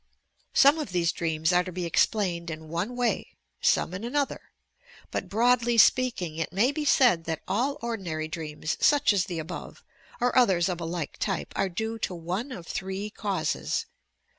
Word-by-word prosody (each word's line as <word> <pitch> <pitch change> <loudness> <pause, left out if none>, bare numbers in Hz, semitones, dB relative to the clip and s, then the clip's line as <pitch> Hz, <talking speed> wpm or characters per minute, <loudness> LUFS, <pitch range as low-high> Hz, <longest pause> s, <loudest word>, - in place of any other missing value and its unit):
Some 285 +4 +6
of 295 -11 -4
these 170 -2 +2
dreams 160 0 0
are 180 0 +4
to 185 - -7
be 180 0 -3
explained 170 -1 +1
in 160 -1 -7
one 180 +9 -2
way, 245 -4 -1 0.3
some 175 - +2
in 190 +4 -5
another; 280 +4 -2 0.6
but - - -3
broadly 240 +2 +3
speaking, 225 -10 +3
it 165 -1 -2
may 215 +9 +3
be 300 0 -3
said 240 - +4
that 160 -1 -3
all 255 +8 0
ordinary 180 -10 -3
dreams, 155 -1 -4
such 290 -7 +4
as 190 -3 +1
the 180 -3 -5
above, 160 +2 -7 0.4
or 245 0 +1
others 195 -8 +4
of 175 -2 -3
a - - -3
like 165 -2 -4
tj 195 -3 -1
pe, - - -16
are 195 - +1
due 220 +5 -3
to 185 - -2
one 180 +10 -4
of 180 -9 -7
three 190 +4 -4
causes: 195 -7 -2
1. - - -42
190 Hz, 185 wpm, -27 LUFS, 170-235 Hz, 0.6 s, Some